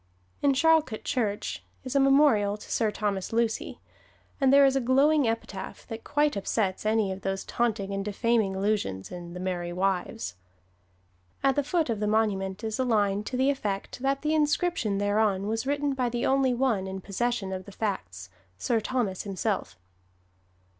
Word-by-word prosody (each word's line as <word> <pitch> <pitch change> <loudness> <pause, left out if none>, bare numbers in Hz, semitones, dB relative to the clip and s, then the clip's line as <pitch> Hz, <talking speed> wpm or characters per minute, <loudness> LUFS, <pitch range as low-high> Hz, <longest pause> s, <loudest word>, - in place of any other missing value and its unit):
In 280 -1 +4
Charlcote 315 -6 +3
Church 220 -7 -2 0.2
is 260 +1 -5
a - - +5
memorial 270 -7 +4
to - - -12
Sir 225 -2 +2
Thomas 205 -3 -2
Lucy; 230 -1 -1 0.6
and 265 -1 +5
there 280 0 +7
is 270 0 +3
a 270 - +2
glowing 275 +3 +4
epitaph 205 -4 -4
that 225 0 -6
quite 295 0 +1
upsets 200 0 -1
any 215 -3 +2
of 190 +1 -6
those 195 0 -3
taunting 210 -5 -1
and 195 0 -2
defaming 210 -1 +1
allusions 190 - -1
in 175 -1 -8
"The - - -5
Merry 180 -2 -3
Wives." 180 - -2 1.1
At 270 -1 +3
the 290 - +1
foot 320 +3 0
of 225 -4 -2
the 210 - 0
monument 205 -3 0
is 220 +2 -3
a - - +3
line 205 -4 +1
to 255 - -3
the 265 +2 +3
effect 205 -8 -4
that 275 +1 0
the 305 +1 +1
inscription 300 - +1
thereon 205 -1 +1
was 225 +4 -2
written 285 0 0
by 255 -2 0
the 240 0 -2
only 265 -2 +3
one 235 -7 +1
in 190 0 -5
possession 200 0 -2
of 185 -1 -5
the 200 - -11
facts, 95 - -4 0.3
Sir 230 - +1
Thomas 220 -5 -1
himself. 200 +1 -3
220 Hz, 175 wpm, -27 LUFS, 195-265 Hz, 1.1 s, there